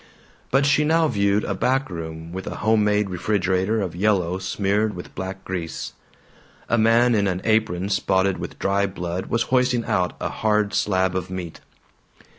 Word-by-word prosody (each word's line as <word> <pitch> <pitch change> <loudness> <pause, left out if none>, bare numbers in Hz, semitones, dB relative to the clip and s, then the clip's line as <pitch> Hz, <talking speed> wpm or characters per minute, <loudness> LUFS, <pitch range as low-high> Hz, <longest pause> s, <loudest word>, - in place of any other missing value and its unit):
But 135 +2 +3
she 145 +1 +3
now 160 +1 +3
viewed 100 -4 +1
a 100 - -2
back 130 +7 +1
room 80 -1 -7
with 95 +1 -6
a - - -4
homemade 105 -2 +3
refrigerator 95 +2 0
of 90 -4 -4
yellow 95 -2 +1
smeared 100 +2 0
with 90 - -9
black 95 +1 -6
grease. 90 -3 -5 0.7
A - - +2
man 115 +2 +4
in 100 -2 +2
an 90 -1 -1
apron 110 -5 +1
spotted 95 -1 +1
with - - -6
dry 100 +1 +1
blood 90 -1 -4
was 115 - +1
hoisting 125 -2 +2
out 90 -1 0
a - - -2
hard 105 -1 0
slab 95 -3 +1
of 95 -1 -3
meat. 90 -3 -6
100 Hz, 165 wpm, -23 LUFS, 95-110 Hz, 0.7 s, man